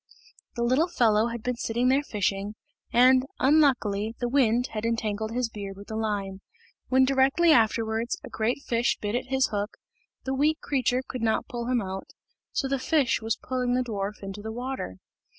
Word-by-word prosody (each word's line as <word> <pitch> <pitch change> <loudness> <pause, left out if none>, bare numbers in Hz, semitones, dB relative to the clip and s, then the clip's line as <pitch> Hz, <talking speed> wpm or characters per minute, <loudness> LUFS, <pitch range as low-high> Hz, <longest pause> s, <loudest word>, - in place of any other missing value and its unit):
The 235 - -1
little 260 +8 +3
fellow 225 -9 +3
had 235 -1 -5
been 250 -1 -2
sitting 240 +2 0
there 270 +2 +4
fishing, 205 -4 -2 0.4
and, 255 +2 +6
unluckily, 245 -7 +2
the 245 - -1
wind 245 -1 +2
had 215 -1 -4
entangled 220 -2 -1
his 245 0 0
beard 200 -3 -7
with 200 - -12
the 220 - -4
line. 200 -3 -2 0.5
When 260 0 +5
directly 275 +5 +4
afterwards 225 -1 +2
a - - -7
great 235 +5 -1
fish 235 0 +1
bit 205 0 -3
at 245 - -2
his 265 0 +1
hook, 205 +1 -3 0.5
the 265 - -2
weak 300 +4 +2
creature 255 -2 0
could 255 - -5
not 225 -1 0
pull 235 -1 -5
him 245 -3 +1
out, 190 0 -6 0.4
so 270 - -1
the 275 0 -1
fish 280 -3 +1
was 225 0 -1
pulling 250 -1 -1
the 255 - +1
dwarf 205 -3 -4
into 195 +1 -6
the 220 +1 -5
water. 245 - -5
235 Hz, 185 wpm, -27 LUFS, 215-260 Hz, 0.5 s, and